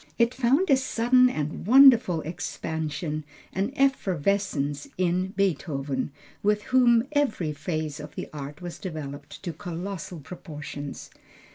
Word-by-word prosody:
It 235 +1 +3
found 270 +8 +2
a 270 - +7
sudden 250 0 +4
and 155 -1 -4
wonderful 240 - +7
expansion, 155 -1 -4 0.3
an 195 +6 -1
efflorescence 195 - 0
in 185 +1 +1
Beethoven, 145 -8 -1 0.3
with 210 0 +2
whom 245 -1 +4
every 255 - 0
phase 155 0 -3
of 150 0 -9
the - - -5
art 145 +3 -7
was 175 -1 -6
developed 155 -5 -7
to 175 -3 -3
colossal 175 +2 -6
proportions. 145 -2 -8
175 Hz, 120 wpm, -26 LUFS, 150-235 Hz, 0.3 s, a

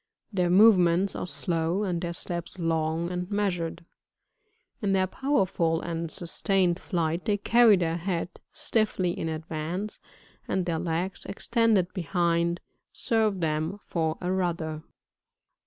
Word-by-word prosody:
Their 180 -2 +1
movements 185 -2 +5
are - - -3
slow, 170 +3 -1
and 175 -4 -1
their 170 -1 -3
steps 170 0 -3
long 165 0 0
and 180 0 -3
measured; 180 -5 -2 1.0
in 200 -2 +1
their 190 -1 +3
powerful 185 - +1
and 165 -1 -3
sustained 180 +1 0
flight, 170 -2 -1
they 210 -2 +2
carry 225 0 +5
their 165 -2 0
head 175 0 -3
stiflBy 195 -5 0
in 160 - -3
advance, 160 +5 -4 0.5
and 185 -2 0
their 165 -2 -1
legs, 175 +2 -2
extended 210 -3 +1
behind, 170 -1 0 0.3
serve 215 -5 0
them 160 +4 -1
for 160 -2 -1
a 180 0 -1
rudder. 170 -4 -1
175 Hz, 125 wpm, -27 LUFS, 165-195 Hz, 1.0 s, movements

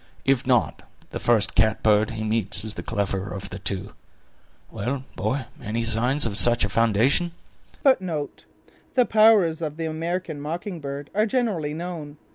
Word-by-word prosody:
If 135 -2 +1
not, 125 -3 +1 0.3
the - - -4
first 115 -4 +2
catbird 110 0 +3
he 110 -2 -5
meets 110 -2 +1
is 110 -1 -4
the - - -6
cleverer 100 -2 -3
of 100 0 -7
the 95 - -6
two. 100 +1 -4 0.8
Well, 125 +6 -3
boy, 130 0 -2 0.2
any 115 +2 -3
signs 120 +5 +2
of 105 -3 +1
such 120 0 +6
a - - -4
foundation?" 115 - +2 0.5
The 190 - -1
powers 215 -7 +4
of 155 -1 -4
the 165 - -3
American 160 -1 -4
mocking 170 +4 -5
bird 140 0 -7
are 215 +2 +2
generally 205 - -1
known. 160 -3 -6
140 Hz, 150 wpm, -24 LUFS, 110-165 Hz, 0.8 s, such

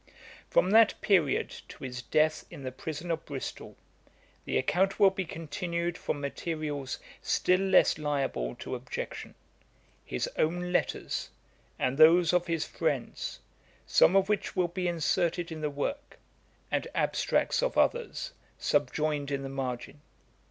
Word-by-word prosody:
'From 185 - +3
that 225 0 +6
period, 180 -9 +2
to - - -12
his 125 -1 -5
death 155 +4 +2
in 140 - -10
the 130 - -4
prison 160 +5 -5
of 165 0 -2
Bristol, 140 -3 -7 0.7
the - - 0
account 190 +8 +1
will 195 -2 +7
be 190 -1 -3
continued 170 +2 -3
from 145 - -3
materials 145 -1 -3 0.2
still 185 0 +2
less 190 -4 +4
liable 135 - -1
to - - -7
objection; - - -5 0.7
his - - -2
own 175 +3 0
letters, 180 - -1 0.5
and 130 +3 -1
those 165 +2 +7
of 180 -1 +2
his 165 -2 0
friends, - - -3 0.4
some 185 - +5
of 195 -1 +4
which 210 -1 -1
will 180 -2 +2
be 180 +1 -2
inserted 170 +1 0
in 160 -1 -6
the 150 - 0
work, 280 - -4 0.5
and - - 0
abstracts - - +1
of - - -1
others 485 +1 +1 0.3
subjoined 150 -2 0
in 140 -1 -2
the 135 - -4
margin. 135 +1 -4
165 Hz, 140 wpm, -29 LUFS, 145-180 Hz, 0.7 s, will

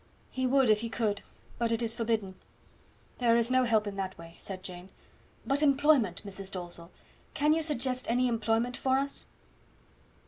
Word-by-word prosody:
"He 260 0 0
would 265 -3 +4
if 210 - +4
he 230 - -3
could, 215 -3 -1 0.4
but 235 -1 +1
it 230 +1 +1
is 225 -1 +1
forbidden. 225 -4 -1 0.9
There 235 -2 +4
is 235 +1 +2
no 255 0 +4
help 220 -3 +2
in 200 -1 -5
that 190 -1 -3
way," 165 0 -12
said 190 -1 -6
Jane. 180 0 -8 0.6
"But 280 +1 +1
employment, 280 - +3
Mrs. 195 -1 -5
Dalzell; 175 -2 -6 0.5
can 300 +1 +3
you 325 - +1
suggest 255 -4 -1
any 250 +2 +3
employment 230 +1 0
for 260 +1 +1
us?" 275 +1 -2
230 Hz, 170 wpm, -30 LUFS, 200-255 Hz, 0.9 s, would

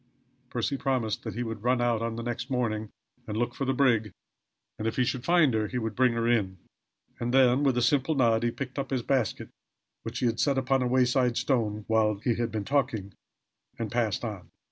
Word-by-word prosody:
Percy 125 +3 -1
promised 130 -6 -1
that - - -5
he 120 - -2
would 115 -2 -5
run 125 +1 +2
out 120 -2 +1
on 115 0 -2
the 115 - -5
next 120 0 -4
morning 110 -4 -1 0.4
and 105 0 -3
look 120 +1 -1
for 135 - -3
the 130 - +1
brig, 120 -5 +2 0.7
and 110 - -2
if 115 - -2
he 130 - +2
should 120 0 -2
find 170 -6 +4
her, 110 -1 0
he 125 - -4
would 110 -3 -3
bring 130 -1 +3
her 115 0 0
in 100 -6 +1 0.6
and 120 0 -2
then, 130 0 +4
with 135 -3 +2
a 120 - +2
simple 140 +4 +2
nod, 115 -4 +3
he 120 - +1
picked 130 +3 -5
up 135 - -3
his 130 -3 -1
basket, 130 -7 -1 0.5
which 115 +1 -6
he 125 - 0
had 115 -1 0
set 140 -2 +2
upon 135 0 +1
a 125 - +1
wayside 125 -1 +2
stone 110 -6 0
while 110 -1 +2
he 115 +4 0
had 115 0 -2
been 105 -2 -3
talking, 115 -8 -1 0.6
and 115 -3 -4
passed 120 -2 0
on. 100 -5 -6
120 Hz, 220 wpm, -28 LUFS, 110-130 Hz, 0.7 s, find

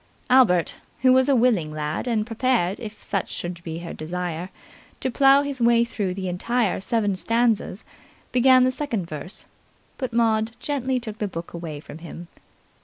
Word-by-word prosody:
Albert, 200 -10 +4 0.3
who 255 -1 +6
was 260 +1 +4
a 275 - +5
willing 225 -11 +2
lad 150 +8 -3
and 220 -3 +1
prepared, 225 -5 0
if 220 -3 -8
such 195 -3 -2
should 175 0 -6
be 165 -1 -5
her 170 0 -7
desire, 175 +1 -4 0.5
to 260 - -2
plough 275 +3 +5
his 280 -3 -5
way 235 0 +4
through 205 -5 -3
the 190 0 -4
entire 205 +3 0
seven 205 -2 0
stanzas, 230 -1 0 0.5
began 255 +1 +6
the 255 - +3
second 245 - -3
verse, 165 +3 -8 0.5
but 255 -3 -3
Maud 225 -1 +1
gently 265 -3 -1
took 220 -3 -7
the 210 - -1
book 170 -3 -7
away 165 -3 -6
from 150 +1 -11
him. 170 +1 -9
220 Hz, 170 wpm, -24 LUFS, 175-250 Hz, 0.5 s, who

